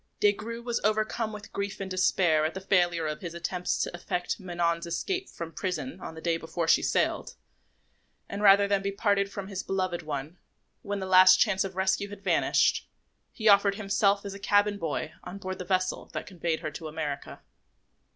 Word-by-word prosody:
Des 205 - +5
Grieux 230 +3 -7
was 240 -1 -2
overcome 215 +1 0
with 210 0 -10
grief 200 0 -3
and 195 -1 -5
despair 180 -4 +3
at 155 +3 -1
the - - -3
failure 175 -4 +2
of 150 0 -3
his 170 -2 -6
attempts 180 +1 -2
to - - -2
effect 175 +2 -3
Manon's 170 -2 -1
escape 375 - -2
from 165 -1 -7
prison 165 -8 -4
on 160 - -7
the 160 - -9
day 165 -1 +1
before 165 +1 -3
she - - +5
sailed, - - 0 0.9
and, 200 - -5
rather 200 0 +6
than 200 -1 +1
be 200 0 -2
parted 200 -1 +1
from 200 -1 -6
his 195 -2 -4
beloved 185 -2 -2
one, 150 +2 -5 0.4
when 205 -1 -3
the - - -3
last 185 0 +7
chance 195 -4 +3
of 190 -1 -6
rescue 190 +2 0
had 205 -1 -10
vanished, - - +2 0.4
he 220 - -2
offered 200 -1 +6
himself 200 -1 +1
as 200 - -5
a 200 - -9
cabin 205 0 +2
boy 160 -1 -3
on 180 +2 -7
board 185 -1 -6
the 180 - -5
vessel 185 0 -1
that - - -4
conveyed 170 -3 -3
her - - -4
to 160 +2 -7
America. 150 -2 -5
190 Hz, 195 wpm, -28 LUFS, 170-200 Hz, 0.9 s, last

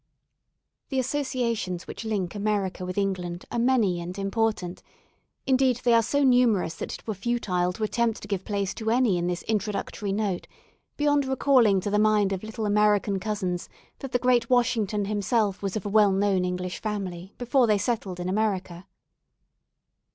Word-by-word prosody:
The 270 - -2
Associations 240 -9 -1
which - - -7
link 200 -6 -2
America 200 -3 -2
with 185 - -5
England 180 -3 -2
are 240 - -1
many 230 -8 +2
and 180 +3 -6
important; 195 -2 -1 0.6
indeed 260 -2 +2
they 240 - +4
are 230 - +6
so 285 +6 +1
numerous 245 -10 +3
that - - -5
it - - -13
were 220 - -2
futile 190 -4 -1
to 220 - -5
attempt 230 +1 0
to - - -7
give 200 -2 -2
place 200 -2 -2
to 220 -1 -3
any 230 -6 +3
in 175 - -1
this 175 -1 -2
introductory 210 -1 -2
note 200 -3 -2 0.5
beyond 290 -1 +2
recalling 255 -7 +3
to 205 - -3
the 210 - +2
mind 210 -2 +3
of 190 - -3
little 220 0 -5
American 205 -1 +2
cousins 185 -3 -3 0.3
that 270 - -7
the - - +3
great 250 -1 +2
Washington 225 -4 +1
himself 205 0 0
was 195 0 -3
of 215 - -3
a - - -2
well 205 -1 +5
known 195 -1 +1
English 180 0 -3
family 190 -3 -5
before 250 0 +2
they 210 -1 +3
settled 200 -4 -2
in 175 - -3
America. 190 -3 -2
210 Hz, 170 wpm, -26 LUFS, 190-235 Hz, 0.6 s, are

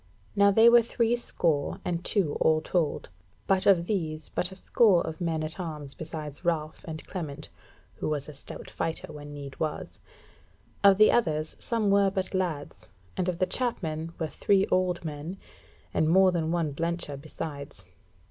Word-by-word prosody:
Now 200 0 +6
they 220 +3 +6
were 240 0 +8
three 235 0 +1
score 160 -11 0
and 175 -1 -2
two 180 -9 +1
all 155 0 +4
told, 160 - -1 0.4
but 190 -1 +2
of 180 -4 +5
these 160 -6 -2
but 180 - -2
a - - -9
score 195 -1 +3
of 160 +2 -6
men 165 -2 -1
at 155 +4 -5
arms 150 -5 -5
besides 155 -2 -7
Ralph, 160 -3 -1
and 155 -1 -6
Clement, 155 -7 -6 0.5
who - - -2
was 150 -2 -2
a 150 - -8
stout 140 - -8
fighter 165 0 -3
when 145 0 -9
need 140 -2 -9
was. 155 -1 -4 0.8
Of 200 -1 +7
the 215 +1 +7
others, 155 -8 +1
some 220 -4 0
were 200 0 +5
but 190 0 -3
lads, 170 -6 -3 0.3
and 185 -1 0
of 175 - -2
the 185 - +2
Chapmen 165 -10 -1
were 165 - -1
three 195 +4 +2
old 180 -2 +1
men, 155 +4 -5 0.6
and 155 - +2
more 190 +2 +6
than 165 -2 -1
one 165 -4 0
blencher 165 -1 -2
besides. 140 - -7
165 Hz, 170 wpm, -28 LUFS, 155-190 Hz, 0.8 s, were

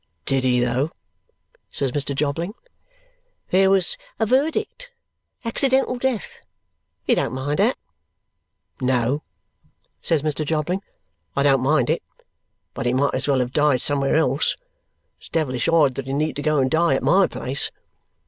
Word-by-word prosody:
"Did 135 -1 +1
he 125 -1 +3
though!" 125 +5 +1 0.8
says 135 -2 -1
Mr. 140 0 -2
Jobling. 155 +8 -2 1.0
"There 190 +1 +5
was 190 -2 +2 0.2
a 220 - +2
verdict. 320 - 0 0.6
Accidental 265 +2 +2
death. 255 -5 -2 0.7
You - - +3
don't - - 0
mind 145 +3 -2
that?" - - +3 1.0
"No," 130 +2 +1 0.8
says 160 -4 +1
Mr. 155 0 -1
Jobling, 160 +5 -1 0.5
"I 140 - +2
don't 135 -2 +4
mind 135 -2 +2
it; - - 0 0.7
but - - -3
he 120 - +2
might 140 +2 +1
as 130 - -2
well 135 -2 +3
have 125 0 -2
died 145 -4 +3
somewhere 140 -1 +1
else. 145 -2 +2 0.6
It's - - -15
devilish 130 -7 -1
odd 155 -5 +4
that 135 0 -6
he 135 - -3
need 150 0 -1
go 155 +1 +1
and 130 -1 +2
die 170 +1 +3
at - - -2
MY 190 +2 +4
place!" 135 +2 -2
145 Hz, 150 wpm, -22 LUFS, 130-170 Hz, 1.0 s, There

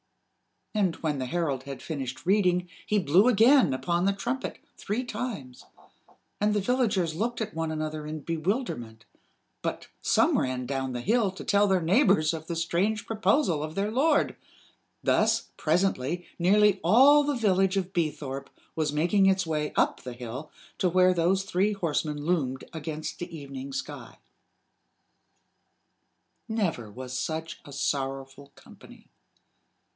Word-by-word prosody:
And 195 -6 +1
when 150 -4 -2
the 130 - -2
herald 140 -3 -1
had 135 0 -7
finished 135 -3 -5
reading 180 -2 +2 0.2
he 210 - +2
blew 185 - +4
again 245 - +5
upon 170 +6 0
the 200 - +3
trumpet 240 +6 -3 0.2
three 220 +5 -3
times; 210 - -6 0.7
and 210 0 +2
the 205 - +2
villagers 210 -8 +1
looked 230 +8 -2
at 215 -1 -3
one 165 -1 -2
another 155 -1 -4
in 155 0 -5
bewilderment 155 - -3 0.6
but - - -4
some - - +3
ran 130 -1 -2
down 130 0 -3
the 120 - -3
hill 220 - +2
to 190 - -9
tell 205 0 +3
their 190 -2 +2
neighbors 175 - +3
of 160 -1 -6
the 170 - -3
strange 190 +7 0
proposal 215 - +1
of 155 +1 -5
their 200 +2 -1
lord. 290 +6 +2 0.7
Thus, - - +2
presently, 175 -1 0
nearly 200 +2 +4
all 270 - +6
the 290 0 0
village 195 -4 +2
of 190 0 -2
Beethorpe 145 -5 -3 0.3
was 155 -2 0
making 175 +6 +3
its 190 -1 +2
way 150 -2 -1
up - - +1
the 125 - -7
hill 125 +5 -7 0.3
to 185 - +2
where 185 +1 +4
those 180 +3 +2
three 195 +2 +1
horsemen 155 -5 -2
loomed 135 -7 0
against 155 -1 -5
the 170 -1 -6
evening 140 -2 -7
sky. - - -6 2.3
Never 185 - -2
was 125 +4 -8
such 160 +4 -3
a 140 - -11
sorrowful 135 0 -3
company. - - -16
170 Hz, 145 wpm, -27 LUFS, 145-205 Hz, 2.3 s, all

